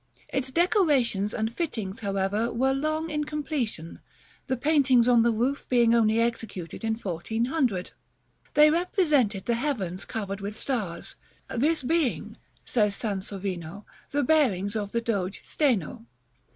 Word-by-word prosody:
Its 265 -1 -1
decorations 285 - +2
and 220 0 -2
fittings, 225 - -3
however, 200 +2 -1
were 265 +3 +1
long 310 +3 -1
in 300 0 -1
completion; 285 - -3 0.5
the 260 -2 0
paintings 265 -4 +4
on 240 -2 +5
the 235 - +3
roof 250 +6 -1
being 235 -2 +4
only 225 -1 +3
executed 225 -7 -3
in 225 0 0
1400. 220 - -1 0.6
They 300 +1 +7
represented 300 - +1
the 235 - +1
heavens 230 - -2
covered 200 -2 -4
with 205 +2 -4
stars, 215 -12 -3 0.4
this 295 +5 +1
being, 310 -2 0 0.3
says 210 -4 +1
Sansovino, 195 -3 -4 0.2
the 285 0 0
bearings 225 - +2
of 205 -2 -3
the 235 - 0
Doge 200 -5 -2
Steno. 220 - -1
235 Hz, 130 wpm, -27 LUFS, 200-285 Hz, 0.6 s, They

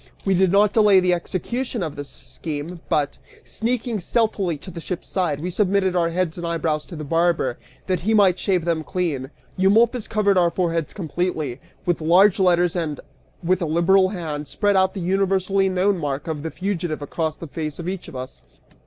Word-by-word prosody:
We 195 - +3
did 185 -1 +3
not 205 +1 +4
delay 210 -3 +6
the 180 -1 +2
execution 230 +6 -3
of 155 -3 -4
this 145 -1 -7
scheme 160 +2 -7
but, 145 -2 0 0.2
sneaking 235 -1 -2
stealthily 195 -4 0
to 185 +6 -10
the 170 - -7
ship's 180 +1 -5
side, 175 -7 -1
we 180 +4 -3
submitted 190 -1 +1
our 170 -2 +2
heads 175 -1 -2
and 170 - -3
eyebrows 160 -2 -1
to 175 - -9
the 155 - -6
barber, 165 -5 +1 0.3
that 185 -2 0
he 215 +6 +1
might 190 -4 +4
shave 185 -5 +1
them 165 -2 0
clean. 155 -7 -2 0.3
Eumolpus 220 +5 +3
covered 205 -3 +2
our 175 -1 +4
foreheads 165 -3 -1
completely, 160 - -3 0.3
with 175 -2 0
large 180 +5 +5
letters 175 -2 +3
and, 160 -4 -2 0.4
with 185 +2 +1
a 170 - 0
liberal 185 +4 +4
hand, 155 -6 -5
spread 205 +5 +1 0.2
the 190 - -4
universally 195 +1 +1
known 185 +1 +1
mark 145 -1 -3
of 155 -3 -3
the 160 - -4
fugitive 175 -5 -3
over 160 +2 -2
the - - -6
face 155 0 -5
of 170 - -6
each 190 -1 -4
of 165 - -10
us. 130 +1 -7
175 Hz, 190 wpm, -22 LUFS, 160-195 Hz, 0.4 s, delay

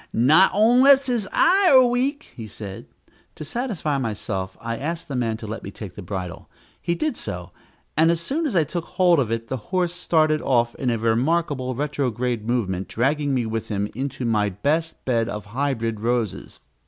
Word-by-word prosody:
"Not 155 +11 +5
onless 255 +6 +5
his 240 -6 -1
eye 390 +1 +4
are 260 -2 +7
weak," 260 +5 -1
he 115 -4 -7
said. 100 -2 -8 0.5
To 155 - -7
satisfy 170 - -2
myself, 105 -5 -4
I 115 0 -4
asked 165 +6 -4
the 140 - -3
man 115 -3 -1
to 110 - -9
let 110 +1 -5
me - - -7
take 100 -2 -9
the 105 - -9
bridle. 90 -1 -6 0.3
He 170 0 -1
did 310 - -1
so, - - -6 0.4
and 160 +1 +4
as 170 -1 +2
soon 300 - -1
as 240 - -3
I 165 - +4
took 165 +3 -4
hold 175 -4 +3
of 120 -5 0
it, 115 0 -2
the 130 - -3
horse 180 -2 0
started 155 -3 +2
off 120 -2 +1
in 130 - -2
a 115 - +1
remarkable 130 +3 0
retrograde 125 -5 -2
movement, 95 -6 -1
dragging 145 +4 0
me 120 -2 0
with 110 -1 -3
him 105 -1 -2
into 135 +1 -4
my 105 -3 +1
best 150 - -2
bed 115 -3 +1
of 105 0 -5
hybrid 115 -1 -2
roses. 115 - -2
130 Hz, 190 wpm, -23 LUFS, 115-170 Hz, 0.5 s, are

